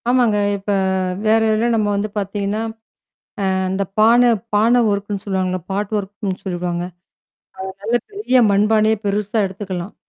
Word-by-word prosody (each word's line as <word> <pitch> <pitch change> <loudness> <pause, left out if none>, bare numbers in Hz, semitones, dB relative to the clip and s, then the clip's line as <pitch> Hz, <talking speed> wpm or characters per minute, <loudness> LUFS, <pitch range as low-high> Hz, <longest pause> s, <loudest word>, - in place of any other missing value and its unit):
ஆமாங்க. 245 -4 +3 0.2
இப்ப 200 +1 -4 0.5
வேற 220 +1 +4
இதில 215 +1 +1
நம்ம 215 -2 +1
வந்து 205 +1 -1
பாத்திங்கன்னா, 200 +1 -2 0.9
அ, - - +1 0.2
இந்த 195 +1 -1 0.2
பான, 235 +3 +6 0.2
பான 230 +4 +4
ஒர்க்குன்னு 200 -1 -3
சொல்லுவாங்கல்ல, 185 -2 -1
பாட் 205 +2 -2
ஒர்க்குன்னு 200 -1 -5
சொல்வாங்க. 175 -1 -2 0.8
அ, - - -4
நல்ல 225 +4 0 0.2
பெரிய 395 - +2
மண்பானய 215 +2 +3
பெருசா 205 +2 0
எடுத்துக்கலாம். 190 -1 -5
205 Hz, 130 wpm, -19 LUFS, 195-220 Hz, 0.9 s, பான